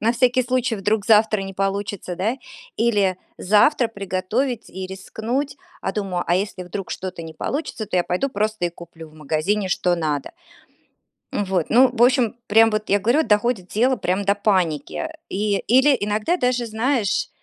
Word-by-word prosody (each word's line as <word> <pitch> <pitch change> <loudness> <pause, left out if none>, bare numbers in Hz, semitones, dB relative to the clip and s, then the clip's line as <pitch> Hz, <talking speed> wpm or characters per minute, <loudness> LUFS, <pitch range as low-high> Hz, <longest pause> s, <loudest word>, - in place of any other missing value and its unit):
на 225 - +2
всякий 250 +1 +3
случай, 255 -1 0
вдруг 205 0 -1
завтра 215 -2 +4
не 195 0 -7
получится, 195 -2 -3
да, 205 +6 0 0.4
или 205 -5 +2 0.2
завтра 225 +7 +3
приготовить 215 +4 -2
и 185 0 -7
рискнуть. 235 +9 -4 0.2
А 195 - -2
думаю: 190 -4 -2
"А 175 - +2
если 185 -1 -2
вдруг 180 +2 -6
что-то 185 -2 -5
не 160 -1 -9
получится, 260 - -4
то - - -6
я 180 - +4
пойду 180 +11 -1
просто 215 -3 -1
и - - +2
куплю 165 -1 -12
в 155 - -20
магазине, 155 +7 -1
что 180 0 +1
надо". 155 -4 -2 1.0
М, 205 - -1
вот, 185 -4 0
ну, 255 +3 +6
в 235 - +1
общем, 245 -2 +3
прям 225 +1 +5
вот 215 0 -2
я 200 - +3
говорю, 240 +10 +2
доходит 210 - +1
тело 250 +7 +2
прям 190 0 -1
до 200 +1 +3
паники. 185 - 0 0.2
И, 205 0 0
или 265 +3 +4
иногда 210 - 0
даже, 250 -5 0
знаешь, 225 0 0
205 Hz, 170 wpm, -22 LUFS, 185-235 Hz, 1.0 s, ну